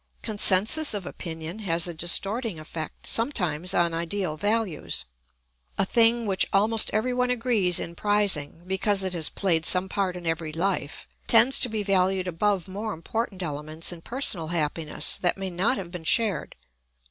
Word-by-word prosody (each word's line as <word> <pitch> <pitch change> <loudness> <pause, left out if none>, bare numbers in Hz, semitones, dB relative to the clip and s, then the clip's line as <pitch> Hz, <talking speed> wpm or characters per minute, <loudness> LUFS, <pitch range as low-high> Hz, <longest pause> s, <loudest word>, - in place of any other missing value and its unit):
Consensus 215 +6 +4
of 195 -3 -4
opinion 165 +2 -7
has 170 -4 0
a 175 - -4
distorting 195 +4 0
effect, 155 0 -7
sometimes, 180 - 0
on 170 -1 +2
ideal 170 0 -2
values. 205 - -1 0.7
A - - +2
thing 230 +2 +3
which 195 -2 +2
almost 215 +3 +3
everyone 250 +3 0
agrees 230 -7 +2
in 170 - -5
prizing, 190 -6 0
because 195 +1 0
it 185 -1 -2
has 165 -3 -1
played 170 -5 +1
some 180 +3 +2
part 190 -2 -2
in 175 - -10
every 165 -1 -2
life, 165 -3 -3 0.2
tends 235 +3 +5
to 250 - +2
be 215 -2 -2
valued 190 -1 +1
above 190 +2 0
more 205 +3 -5
important 190 +3 -4
elements 155 +1 -2
in 170 -2 -9
personal 205 - +2
happiness 155 -1 -2
that 180 -1 0
may 190 -1 -4
not 195 +9 +1
have 175 -3 -7
been 175 -2 -7
shared. 210 +1 +1
190 Hz, 160 wpm, -25 LUFS, 165-215 Hz, 0.7 s, tends